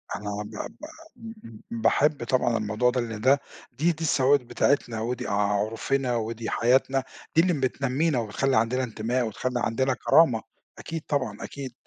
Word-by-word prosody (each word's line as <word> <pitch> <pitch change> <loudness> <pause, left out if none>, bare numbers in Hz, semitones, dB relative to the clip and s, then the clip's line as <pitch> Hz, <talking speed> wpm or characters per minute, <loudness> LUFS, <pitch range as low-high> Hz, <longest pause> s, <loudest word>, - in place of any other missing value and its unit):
أنا 105 0 -5
با 105 0 -6
با 305 - -12 0.3
م 225 0 -9
م 115 -2 -12
م 115 - -4
باحب 145 +3 +2
طبعًا 120 -1 +1
الموضوع 110 +3 +1
ده 125 - 0
لأن 110 -2 -5
ده 135 +3 +4 0.3
دي 155 +8 +1
دي 165 0 -6
الثوابت 140 -2 +3
بتاعتنا، 120 -3 0
ودي 120 +3 -3
عُرفنا 110 +6 0
ودي 115 0 -3
حياتنا، 130 +2 +2 0.3
دي 165 - +7
اللي 180 0 +2
م 150 - -2
بتنمّينا 135 +2 0
وبتخلّي 130 +5 0
عندنا 125 +4 +1
انتماء 120 +1 -1
وتخلّى 125 +3 -2
عندنا 130 +3 +1
كرامة، 125 -4 +4 0.4
أكيد 165 -1 -5
طبعًا 130 -8 -1
أكيد. 135 -3 -7
125 Hz, 165 wpm, -26 LUFS, 115-135 Hz, 0.4 s, دي